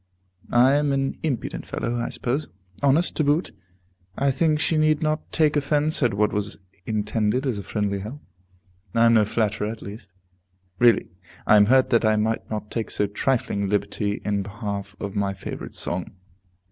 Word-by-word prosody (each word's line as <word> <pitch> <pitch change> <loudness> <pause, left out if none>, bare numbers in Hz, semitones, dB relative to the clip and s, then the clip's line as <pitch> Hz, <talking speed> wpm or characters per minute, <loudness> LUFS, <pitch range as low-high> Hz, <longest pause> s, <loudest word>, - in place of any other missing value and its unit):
I 125 +3 +5
am 145 0 +2
an 135 0 0
impudent 140 -8 -3
fellow, 120 - -3
I 120 - -2
suppose. 135 +5 -2 0.3
Honest, 145 +5 +2
to 155 - +2
boot. 150 +4 +1 0.7
I 140 0 +2
think 155 +2 +1
she 160 +2 +1
need 155 0 +2
not 155 0 -1
take 155 -2 +2
offence 150 +2 +1
at 120 -6 +2
what 105 +1 +1
was 105 0 -3 0.3
intended 110 +3 0
as 120 -6 -1
a - - -6
friendly 100 -1 -2
help. 110 +9 -7 0.8
I 115 0 +5
am 115 - +5
no 110 -2 +5
flatterer, 105 -1 -1
at 110 0 -7
least. 100 0 -10 0.7
Really, 120 -3 +4 0.4
I - - +6
am 105 -1 +6
hurt 130 +2 +4
that 115 -1 +4
I 110 -1 +4
might 110 +1 -1
not 105 -1 -5
take 115 -2 -3
so 105 - +1
trifling 100 -1 -1
a - - -1
liberty 105 0 -1
in 100 -1 0
behalf 100 -1 -5
of 100 0 -5
my 100 -1 0
favorite 95 - -7
song. 85 0 -2
115 Hz, 180 wpm, -24 LUFS, 105-140 Hz, 0.8 s, I